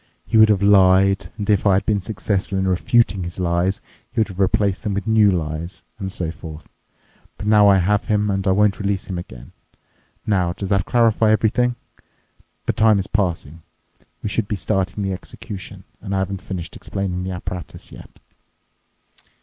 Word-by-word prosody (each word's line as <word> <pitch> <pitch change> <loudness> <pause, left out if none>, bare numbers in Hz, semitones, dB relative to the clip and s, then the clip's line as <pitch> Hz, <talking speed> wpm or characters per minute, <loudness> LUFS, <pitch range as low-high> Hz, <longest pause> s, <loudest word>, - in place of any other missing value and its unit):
He 115 - -4
would 110 0 +7
have 100 -2 +2
lied, 95 -1 +4
and 100 -2 -4
if 105 -2 +2
I 95 - +5
had 95 - 0
been 105 -2 +1
successful 95 0 -2
in 95 0 0
refuting 95 +1 +2
his 85 0 -6
lies, 90 +2 0 0.3
he - - -3
would 110 - +2
have 95 -1 -10
replaced 100 0 +1
them 105 -4 -2
with 100 - -3
new 110 -2 +4
lies, 85 0 -3 0.2
and 95 -2 -4
so 85 -3 -2
forth. 80 -2 -10 0.7
But - - -7
now 105 -1 +5
I 100 -1 +6
have 100 +3 +1
him, 105 -1 +1
and 95 0 -2
I - - +4
won't 100 +1 +2
release 100 -2 -1
him 90 -3 -4
again. 65 -8 -11 0.7
Now, 90 -5 +1
does 95 +1 -6
that 100 -3 +1
clarify 115 -2 +3
everything? 115 +3 +2 0.9
But - - -1
time 110 -1 +5
is 95 - -1
passing. 85 -6 -2 0.6
We - - -2
should 105 0 -1
be 105 - -2
starting 95 0 -2
the 95 -1 -1
execution, 95 +1 -9 0.2
and 100 - -4
I - - +1
haven't 95 0 -2
finished 90 -3 -6
explaining 95 -2 -4
the 95 0 -4
apparatus 90 0 -7
yet." - - -12
95 Hz, 180 wpm, -21 LUFS, 90-105 Hz, 0.9 s, would